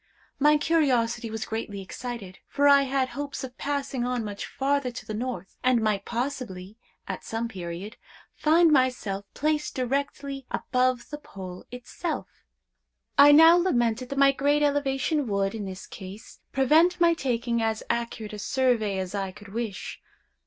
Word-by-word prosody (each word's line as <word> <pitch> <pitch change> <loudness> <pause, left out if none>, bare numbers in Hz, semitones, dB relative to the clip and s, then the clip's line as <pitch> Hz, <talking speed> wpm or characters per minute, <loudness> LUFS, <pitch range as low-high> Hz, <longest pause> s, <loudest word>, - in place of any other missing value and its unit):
My 300 +1 +5
curiosity 260 -8 +1
was 220 0 -4
greatly 220 -2 -4
excited, 195 0 -7
for 285 0 +2
I 280 0 +7
had 265 -1 0
hopes 285 +1 -5
of 255 -1 -7
passing 275 -3 -2
on 245 -1 -1
much 205 -1 -5
farther 280 -1 0
to 235 - -8
the 220 - -5
north, 240 -2 -5
and 255 -1 +4
might 210 -3 0
possibly, 235 -6 -4 0.3
at - - -5
some 225 +1 -3
period, 185 +1 -7 0.4
find 325 +2 +4
myself 250 -8 +1
placed 300 +1 -1
directly 275 +1 -2
above 255 0 0
the 295 - -5
Pole 185 -9 -9
itself. 250 +7 -5 0.9
I 285 +1 +8
now 325 +3 +8
lamented 250 -8 +1
that 275 - -4
my 275 0 +6
great 285 +2 +2
elevation 285 0 +1
would, 200 -1 0
in 215 -3 -4
this 190 0 -7
case, 195 +4 -11
prevent 320 +7 +4
my 340 -1 +5
taking 240 -5 -1
as 220 -1 -1
accurate 230 -2 -3
a 210 - -6
survey 225 -3 +1
as 185 0 -4
I 195 -2 -2
could 200 +2 -14
wish. 225 -3 -5
250 Hz, 155 wpm, -26 LUFS, 215-280 Hz, 0.9 s, I